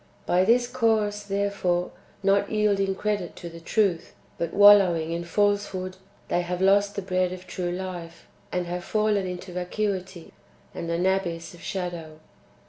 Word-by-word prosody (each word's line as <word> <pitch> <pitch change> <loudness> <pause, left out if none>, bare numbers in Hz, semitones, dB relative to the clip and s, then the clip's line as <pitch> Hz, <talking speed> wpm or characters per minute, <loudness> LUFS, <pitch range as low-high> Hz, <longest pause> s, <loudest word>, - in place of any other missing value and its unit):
By 180 +1 +3
this 240 +3 +4
course, 220 -4 +1
therefore, 200 -3 -1 0.3
not 200 +1 +2
yielding 200 -3 +1
credit 205 -3 -2
to 170 - -8
the 165 0 -10
truth, 180 0 0 0.2
but 170 -1 -2
wallowing 195 -6 +6
in 170 +1 -2
falsehood, 190 0 0 0.3
they 175 - +1
have 175 0 -3
lost 200 +1 +3
the 200 - -3
bread 185 -1 0
of 185 0 -8
true 180 -2 -3
life, 175 -2 -6 0.3
and 180 -1 -1
have 175 +1 -4
fallen 210 -2 +1
into 180 0 -7
vacuity" 185 -1 -3 0.4
and 170 - -5
an 170 +2 0
abyss 180 -4 -1
of 175 - -14
shadow. 170 -4 -5
185 Hz, 150 wpm, -26 LUFS, 175-205 Hz, 0.4 s, wallowing